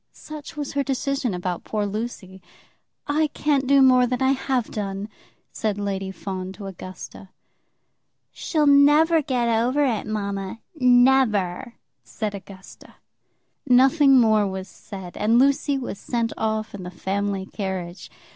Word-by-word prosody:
Such 305 -1 -10
was 290 -2 -4
her 285 - +1
decision 270 -4 -2
about 180 -1 -4
poor 210 -1 -2
Lucy. 200 -3 -6 0.6
"I 305 +2 +1
can't 280 -3 +1
do 275 0 +5
more 255 -1 +5
than 250 0 -2
I 265 0 +3
have 265 -3 -1
done," 200 0 -4 0.4
said 215 -2 -2
Lady 195 -1 -3
Fawn 190 -1 -6
to 200 0 -10
Augusta. 190 0 -9 1.0
"She'll 310 -3 -1
never 295 +3 +5
get 250 -4 -1
over 240 +5 +2
it, 225 -5 -1
mamma; 200 -1 -4
never," 245 - +3 0.3
said 215 -2 -5
Augusta. 195 -1 -12 0.7
Nothing 270 +2 +5
more 215 -3 +3
was 190 0 -5
said, 190 -2 -10
and 220 +3 +2
Lucy 280 +2 +2
was 245 -6 -6
sent 230 0 -2
off 220 0 -2
in 200 - -7
the 180 - -6
family 195 +2 -3
carriage. 190 -3 -6
225 Hz, 135 wpm, -23 LUFS, 195-270 Hz, 1.0 s, do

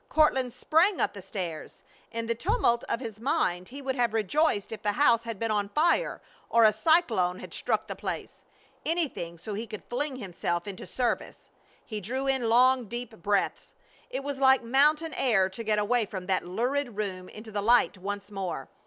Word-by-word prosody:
Courtland 265 -5 +3
sprang 345 - +2
up - - +1
the 200 - -8
stairs. 180 -4 -6 0.3
In 230 -1 -3
the 230 - 0
tumult 270 - +1
of - - 0
his 220 -4 -7
mind 200 - 0
he 275 +3 -9
would 265 0 -1
have 240 -3 +1
rejoiced 220 - +1
if 220 -2 -6
the 205 -1 0
house 235 -3 +4
had 230 -2 -4
been 225 +2 -1
on 205 -1 0
fire, 335 - +1 0.3
or 230 0 +5
a 215 - +6
cyclone 220 - +3
had - - -9
struck - - -1
the - - -6
place - - -6 0.4
anything 300 - -1
so 190 +6 -7
he 220 +3 -4
could 215 -1 -8
fling 270 +3 -2
himself 175 -5 -3
into 195 -2 -7
service. 250 -2 -3 0.3
He 215 -2 -5
drew 260 +7 -3
in 265 -4 +1
long, 250 +1 +5
deep 240 +1 -6
breaths. 200 +2 -1 0.3
It - - -4
was 280 -1 -4
like 265 -1 +5
mountain 300 +6 +3
air 205 -7 +2
to 210 +5 -6
get 215 -1 +1
away 220 +2 +1
from 190 -2 -6
that 185 -1 0
lurid 245 +4 -1
room 185 -3 -4
into 220 +1 -10
the 205 -1 -2
light 235 +2 +4
once 200 +2 -5
more. 195 -3 -4
230 Hz, 190 wpm, -28 LUFS, 200-265 Hz, 0.4 s, a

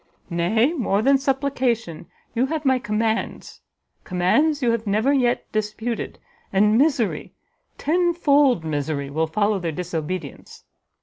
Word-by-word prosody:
"Nay, 220 - +2
more 215 - 0
than 275 +1 +4
supplication, 260 - -1 0.3
you 245 +3 +1
have 310 0 -3
my 260 -1 +3
commands; 220 0 -2 0.4
commands 280 - +1
you 235 - +3
have 230 -1 -2
never 220 +8 +2
yet 245 -3 +1
disputed, 215 +2 -3 0.3
and 210 +2 +3
misery, 265 -4 +1 0.4
ten 345 +3 +1
fold 280 - +3
misery, 145 -2 -3
will 160 +2 0
follow 205 +4 0
their 170 -2 -3
disobedience. 175 +1 -5
225 Hz, 125 wpm, -22 LUFS, 185-270 Hz, 0.4 s, than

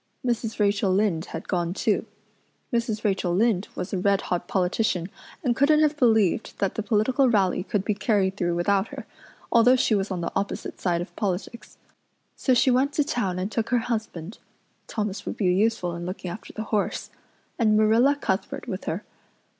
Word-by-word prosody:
Mrs. 235 -2 -1
Rachel 200 -1 +2
Lynde 190 -4 +1
had - - -7
gone 175 -1 -1
too. - - 0 0.7
Mrs. 230 -2 -1
Rachel 190 -4 0
Lynde 210 -1 +2
was 180 - -5
a 190 - 0
red 200 +1 +2
hot 175 - -2
politician 185 -1 0 0.3
and 245 -4 +1
couldn't 300 +4 +4
have 305 -1 +3
believed 225 - +2
that 195 - 0
the - - -2
political 240 +5 +2
rally 195 -6 +2
could 200 +1 -2
be 210 - +1
carried 200 -2 +1
through 175 -3 0
without 195 +4 +1
her, - - -8 0.5
although 235 +2 +6
she 255 -3 +2
was 195 -1 +1
on 185 -3 -3
the 170 - -3
opposite 195 +1 -3
side 175 -2 +1
of 175 - -8
politics. 205 +4 -4 0.6
So 255 - +2
she 255 +2 +4
went 265 +3 +2
to 295 - +2
town 200 -10 -1
and 190 +3 -3
took 225 0 -1
her 250 - +3 0.2
husband 205 -4 -5 0.5
Thomas 210 -2 -3
would - - -4
be 205 - 0
useful 195 -3 +1
in 170 +1 -5
looking 185 -1 -5
after 215 - -9
the 220 - -5
horse 210 - -1 0.5
and 215 -2 +4
Marilla 225 +6 +4
Cuthbert 205 -3 -3
with 190 -4 -5
her. 180 +6 -3
210 Hz, 185 wpm, -25 LUFS, 185-230 Hz, 0.7 s, although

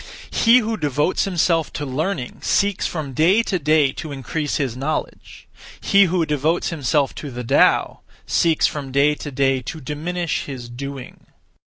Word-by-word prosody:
He 230 +2 +5
who 225 -2 0
devotes 150 +2 0
himself 170 -4 +1
to 150 - -4
learning 140 0 -3
(seeks) 200 -1 +1
from 150 -5 -5
day 180 - +3
to 190 -5 -1
day 150 -2 +3
to 155 +2 -7
increase 145 +2 -3
(his 135 -6 -1
knowledge); 140 +5 -5 0.3
he 200 0 +4
who 175 -2 +1
devotes 150 +3 0
himself 145 -3 0
to 145 - -7
the 125 -1 -6
Tao 115 - +3 0.3
(seeks) 165 -2 +2
from 140 -3 -3
day 140 +2 +3
to 150 - -7
day 135 -1 +1
to 160 +6 -7
diminish 160 +4 -3
(his 125 -4 -7
doing). 135 +1 -8
150 Hz, 160 wpm, -21 LUFS, 135-170 Hz, 0.3 s, He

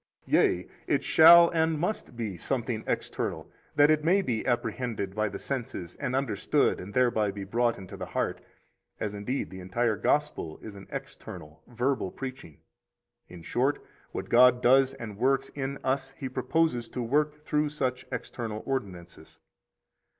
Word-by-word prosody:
Yea, 90 0 +2 0.2
it - - +1
shall 170 +1 +8
and 160 -1 +1
must 175 - -3
be 110 -5 -3
something 85 - -2
external, - - -3 0.3
that 145 +1 +6
it 155 -1 +2
may 190 +5 +3
be 115 -9 -1
apprehended 115 -4 -2
by 110 +1 0
the - - -6
senses, 120 -10 -5
and 125 - -2
understood 130 -7 +1
and 100 +3 -9
thereby 120 -5 +3
be 100 0 -5
brought 115 +4 +1
into 95 -2 -9
the - - -6
heart, - - -2 0.6
as 105 -1 -3
indeed 105 +7 -3
the 95 - -8
entire 110 +5 0
Gospel 145 - 0
is 110 - -8
an 100 -1 -12
external, 75 +1 -8
verbal 125 -2 -1
preaching. 130 - -8 0.7
In 90 -2 -12
short, 130 - 0 0.3
what - - -5
God 125 +1 +6
does 130 +2 +4
and 105 -3 -8
works 135 +2 +2
in 140 0 -4
us 135 0 0
He 135 - -4
proposes 130 -1 0
to 125 - -4
work 150 +5 +1
through 150 0 -1
such 130 -4 -2
external 115 -3 -5
ordinances. 95 -10 -5
125 Hz, 155 wpm, -28 LUFS, 105-140 Hz, 0.7 s, shall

